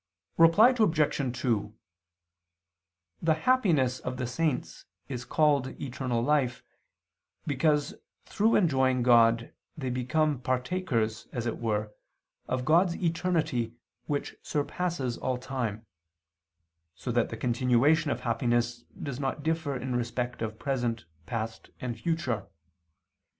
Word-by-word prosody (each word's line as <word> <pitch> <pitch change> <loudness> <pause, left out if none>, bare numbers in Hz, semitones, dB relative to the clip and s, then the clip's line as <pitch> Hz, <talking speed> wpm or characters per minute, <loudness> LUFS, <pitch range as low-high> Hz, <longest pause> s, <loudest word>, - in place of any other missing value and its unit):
Reply 165 +9 +7
Obj. 150 - +1
2: 110 -4 0 1.5
The 160 -1 +3
happiness 160 - +2
of 125 0 -5
the 125 - -2
saints 135 +2 -2 0.2
is 125 -2 -5
called 140 -1 +1
eternal 125 -3 -2
life, 130 -3 +1 0.8
because 150 +3 +1 0.3
through 220 +2 +2
enjoying 130 -8 +3
God 115 -1 +4 0.2
they 130 -4 -3
become 135 +3 +1
partakers, 125 -3 -1
as 120 -2 -3
it 115 - -2
were, 105 -2 -1 0.5
of 125 -1 -2
God's 170 +3 +4
eternity 160 -9 0 0.3
which 145 -1 -2
surpasses 145 -4 -2
all 130 -1 -1
time: 120 -4 -4 1.1
so 120 - -4
that 120 0 +1
the 115 - -6
continuation 125 +6 +3
of - - -2
happiness 120 0 0 0.2
does 140 -3 -4
not 140 +1 -2
differ 160 -3 -1
in 125 0 -3
respect 120 0 -2
of 110 -1 -3
present, 120 -6 -2 0.2
past 115 -1 -4
and 125 -2 -3
future. 130 - -1
130 Hz, 115 wpm, -29 LUFS, 120-155 Hz, 1.5 s, Reply